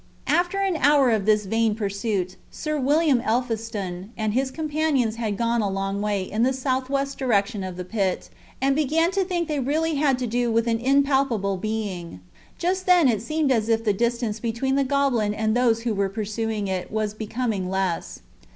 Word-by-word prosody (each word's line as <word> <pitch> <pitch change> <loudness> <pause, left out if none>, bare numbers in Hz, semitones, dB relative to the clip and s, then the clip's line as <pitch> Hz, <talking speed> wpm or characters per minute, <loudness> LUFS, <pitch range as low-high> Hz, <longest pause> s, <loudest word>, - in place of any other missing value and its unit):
After 355 +2 +1
an 390 -3 +1
hour 285 -3 +4
of 215 -2 0
this 210 -1 +3
vain 225 +1 +1
pursuit 200 -3 -2
Sir 305 -1 -3
William 285 -1 +3
Elphiston 220 -6 -2
and 215 -1 -1
his 260 +2 +1
companions 295 -6 0
had 215 -4 -2
gone 235 +1 +1
a 205 - 0
long 195 +1 -2
way 205 -2 0
in 215 +4 -3
the 260 +2 +3
southwest 265 +1 -1
direction 210 -5 +1
of 185 -1 -6
the 180 - -5
pit, 195 -2 -2 0.3
and 270 +1 +2
began 315 +4 +2
to 390 0 +1
think 350 -3 -2
they 300 -2 -1
really 310 +5 0
had 280 -3 +2
to 250 - -2
do 240 +1 0
with 230 0 +2
an 225 -1 +1
impalpable 265 -6 +2
being. 195 - -4 0.4
Just 370 +2 -1
then 355 -5 +6
it 220 -5 +1
seemed 305 +3 0
as 225 -3 +1
if 225 0 +2
the 210 -3 +2
distance 235 0 -1
between 235 +4 -1
the 275 0 +3
goblin 260 -6 +1
and 220 +1 0
those 230 -2 +2
who 235 -2 0
were 200 -1 0
pursuing 215 0 -3
it 185 -1 -3
was 215 -1 -1
becoming 215 -3 -3
less. 190 -3 -2
230 Hz, 190 wpm, -24 LUFS, 210-275 Hz, 0.4 s, then